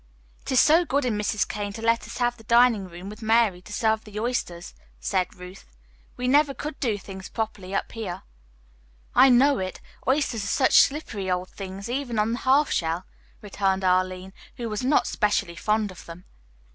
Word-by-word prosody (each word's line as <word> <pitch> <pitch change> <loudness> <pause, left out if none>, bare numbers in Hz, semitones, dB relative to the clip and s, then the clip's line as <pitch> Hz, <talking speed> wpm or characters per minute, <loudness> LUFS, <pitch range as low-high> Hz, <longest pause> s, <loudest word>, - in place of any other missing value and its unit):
"It - - -6
is 260 - +4
so 320 +6 +5
good 285 -4 0
in 235 -4 0
Mrs. 210 0 0
Kane 205 -1 -4
to 225 - -8
let 230 0 +1
us - - -8
have 240 -1 +1
the 225 - -16
dining 235 -4 +4
room 175 +2 -10
with 210 +3 -9
Mary 220 -4 +2
to 210 - -14
serve 220 0 +1
the 210 0 -7
oysters," 215 -7 -3 0.3
said 185 -2 -1
Ruth. 180 +1 -12 0.5
"We 250 - -2
never 285 +1 +3
could 300 -1 -6
do 225 -6 0
things 190 -1 -9
properly 205 -4 -4
up - - -2
here." 215 -6 -6 0.9
"I 270 - +7
know 265 +3 +5
it. 185 0 -4 0.3
Oysters 260 -5 +1
are - - -4
such 260 +5 +4
slippery 225 -10 -2
old 180 0 -1
things, 195 +1 -7
even 245 -1 -3
on 210 +1 +1
the 240 - -2
half 275 +3 +3
shell," 165 +2 -1 0.4
returned 195 -1 -1
Arline, 185 0 0 0.2
who 235 -2 -4
was 210 +2 -3
not 275 +3 +3
specially 205 -5 0
fond 210 +2 0
of 185 - -12
them. 170 +2 -11
215 Hz, 190 wpm, -25 LUFS, 190-245 Hz, 0.9 s, I